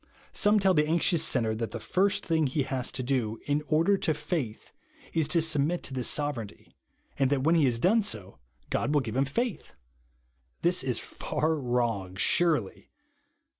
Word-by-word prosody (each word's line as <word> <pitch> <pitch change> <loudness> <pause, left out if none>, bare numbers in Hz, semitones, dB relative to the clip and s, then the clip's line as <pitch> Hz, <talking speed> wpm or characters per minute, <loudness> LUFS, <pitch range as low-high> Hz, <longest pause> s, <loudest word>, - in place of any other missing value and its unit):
Some 210 +1 +4
tell 190 -1 +3
the 150 -2 +2
anxious 165 0 +2
sinner 115 -7 +1
that 110 0 -3
the 115 - -6
first 190 - 0
thing 160 -3 +1
he 135 +2 -1
has 130 -2 -2
to 130 - -3
do, 120 -4 -1
in 145 +1 0
order 165 +6 +2
to 155 - 0
faith, 135 - -4 0.4
is 160 -3 +1
to 170 -2 +3
submit 160 +2 +1
to 135 - -3
this 125 -2 0
sovereignty, 145 -8 -3 0.4
and 135 -2 +3
that 135 -2 0
when 160 +3 +3
he 165 - +4
lias 120 -3 +2
done 200 - +3
so, 100 - -4 0.3
God 150 - 0
will 145 - +4
give 115 -3 -6
him 135 +1 +2
faith! 230 - -3 0.9
Thia - - +2
is - - 0
far 160 +1 -2
wrong 120 -8 -2
surely. 150 - +1
145 Hz, 175 wpm, -28 LUFS, 120-165 Hz, 0.9 s, Some